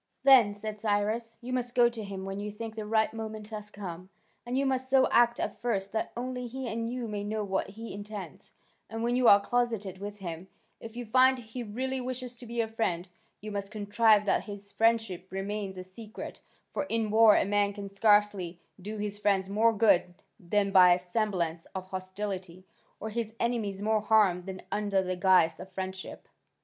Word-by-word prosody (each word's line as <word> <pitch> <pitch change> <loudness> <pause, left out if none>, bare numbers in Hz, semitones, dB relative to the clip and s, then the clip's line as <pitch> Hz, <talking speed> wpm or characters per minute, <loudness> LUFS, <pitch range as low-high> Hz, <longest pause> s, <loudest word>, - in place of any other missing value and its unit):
"Then," 250 -7 +7
said 215 0 -6
Cyrus, 215 +2 -1
"you 250 +1 -5
must 245 -1 -2
go 240 -1 +6
to 235 -2 -5
him 195 -1 -6
when 195 +1 -4
you 210 +1 -4
think 220 +1 -6
the 215 -1 -6
right 220 0 +2
moment 220 -1 -6
has 210 -1 -7
come: 185 -3 -8 0.4
and 250 +2 -1
you 275 - +2
must 260 -1 -1
so 265 -1 +5
act 235 0 +4
at - - -3
first 200 -5 -1
that 220 - -2
only 250 0 -3
he 260 +2 -5
and 230 +1 -3
you 245 -2 -3
may 205 -1 -4
know 215 +1 -2
what 190 -1 -1
he 225 +3 -8
intends, 205 0 -8 0.4
and 225 0 -4
when 240 +1 +1
you 250 -1 +3
are 200 - +9
closeted 210 -3 -1
with 205 +1 -6
him, 175 -2 -6 0.3
if 225 0 -10
you 245 0 -5
find 260 +3 +5
he 240 +1 -7
really 255 +4 -3
wishes 250 -1 -5
to 240 - -11
be 235 0 -1
a 225 - -1
friend, 190 -6 -2 0.3
you 215 +1 -6
must 200 -1 -4
contrive 210 0 +3
that - - +1
his 200 -1 -9
friendship 225 -6 +1
remain 200 +2 -3
a 185 - -5
secret: 210 +4 -9 0.3
for 290 - -1
in 225 -5 -1
war 220 -1 +7
a - - +3
man 205 0 +2
can 200 0 -7
scarcely 200 -3 +2 0.2
do 210 +3 -6
his 205 0 -4
friends 195 -2 +1
more 220 +3 +4
good 200 -5 +3 0.2
than 200 +2 0
by 180 -2 +8
a - - -2
semblance 180 -3 -2
of 185 -1 -4
hostility, 185 -1 -5 0.3
or 220 - -4
his 225 0 -4
enemies 215 -5 -1
more 215 0 +2
harm 205 -4 +3
than 190 -1 -7
under 205 -2 +1
the 185 0 -2
guise 180 -3 +4
of 185 +1 -9
friendship." 190 0 -6
210 Hz, 200 wpm, -29 LUFS, 195-230 Hz, 0.4 s, are